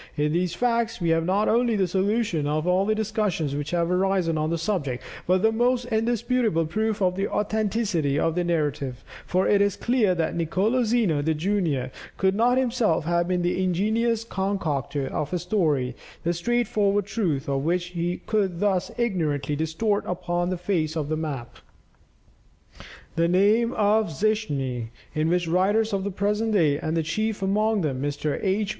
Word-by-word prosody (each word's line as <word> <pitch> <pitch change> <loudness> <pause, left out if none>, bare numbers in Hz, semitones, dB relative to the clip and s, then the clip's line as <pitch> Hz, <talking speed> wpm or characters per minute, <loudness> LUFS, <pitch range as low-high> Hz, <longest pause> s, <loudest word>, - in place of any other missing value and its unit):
In 150 +1 +1
these 175 0 0
facts 235 0 0
we 170 -2 0
have 165 0 +2
not 195 +4 +1
only 235 0 +2
the 190 -3 +1
solution 190 -4 0
of 155 +2 -1
all 185 +2 +2
the 215 - +2
discussions 210 -9 -1
which 145 +1 -3
have 170 0 0
arisen 185 -2 +1
on 155 0 0
the 170 - 0
subject, 160 -8 -2 0.2
but 185 +2 +2
the 220 - +5
most 245 +2 +1
indisputable 225 -4 +1
proof 215 +4 -1
of 180 -1 +2
the 195 +1 -1
authenticity 210 -8 0
of 165 - +1
the 180 +1 0
narrative; 145 -6 -2 0.2
for 185 +1 +1
it 200 -1 +4
is 200 -1 +2
clear 235 -7 +1
that 165 -2 -1
Nicolo 190 +9 +1
Zeno, 215 -10 +2
junior, 155 -4 0 0.3
could 190 0 +2
not 240 +5 +3
himself 235 -11 +1
have 170 +1 +1
been 180 -1 0
the 180 +1 0
ingenious 220 +5 +1
concocter 170 - -2
of 150 +3 -3
a - - +2
story 150 - 0 0.3
the 170 - +1
straightforward 205 0 +1
truth 185 - -1
of 135 -1 -1
which 175 +2 0
he 175 +1 -2
could 195 -5 0
thus 195 -3 +1
ignorantly 155 - -1
distort 165 +8 0
upon 175 0 -1
the 185 - -2
face 170 -4 -1
of 150 -2 -2
the 155 - 0
map." 140 -7 -5 1.6
The 165 0 +2
name 210 +6 +3
of 215 -1 +2
Zichmni, 145 - -1 0.3
in 155 0 0
which 175 0 +1
writers 205 +6 +2
of 195 -1 0
the 200 - -2
present 210 +3 0
day, 150 -7 +3
and 160 0 -1
chief 215 +4 -2
among 210 +2 +1
them 135 -5 -2
Mr. 145 +1 -2
H. 200 +1 0
185 Hz, 170 wpm, -25 LUFS, 160-215 Hz, 1.6 s, the